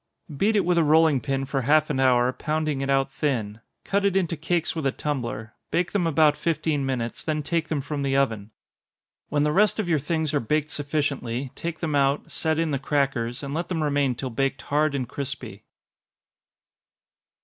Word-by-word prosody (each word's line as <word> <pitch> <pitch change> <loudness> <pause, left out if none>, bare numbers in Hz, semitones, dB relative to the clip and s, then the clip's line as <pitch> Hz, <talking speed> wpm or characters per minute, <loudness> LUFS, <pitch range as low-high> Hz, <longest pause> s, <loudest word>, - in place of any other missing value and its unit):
Beat 210 +10 +2
it 205 - +3
with 175 -1 +3
a - - +4
rolling 155 -3 +4
pin 135 +3 -1
for 135 0 -1
half 150 +4 +3
an 135 - -1
hour, 125 -1 +4
pounding 155 +1 -1
it 135 - -2
out 135 0 +2
thin 115 -8 -2 0.2
cut 200 0 0
it 200 -1 +2
into 170 -3 0
cakes 165 +2 -1
with 160 -4 -1
a - - +2
tumbler 120 -7 -4 0.2
bake 175 0 0
them 185 -5 +1
about 155 -1 +4
fifteen 155 -3 -1
minutes, 120 -3 -3
then 155 -1 -2
take 165 +2 -1
them 150 -3 -1
from 140 +1 -4
the 135 -1 +1
oven. 110 -7 0 0.8
When 145 -1 +1
the 150 - +2
rest 205 +6 +3
of 215 -5 -1
your 160 -3 +2
things 155 +1 -1
are 145 - +3
baked 150 +5 -1
sufficiently, 140 -4 -2
take 165 -1 -5
them 160 -3 -1
out, 140 0 +1
set 160 -1 0
in 165 -1 0
the 140 - 0
crackers, 135 -3 -1
and 140 0 -4
let 170 +2 -3
them 165 -4 -1
remain 145 -3 +1
till 130 +2 -5
baked 135 +3 -1
hard 150 0 +1
and 130 -3 -2
crispy. 135 +1 -6
145 Hz, 195 wpm, -25 LUFS, 135-160 Hz, 0.8 s, a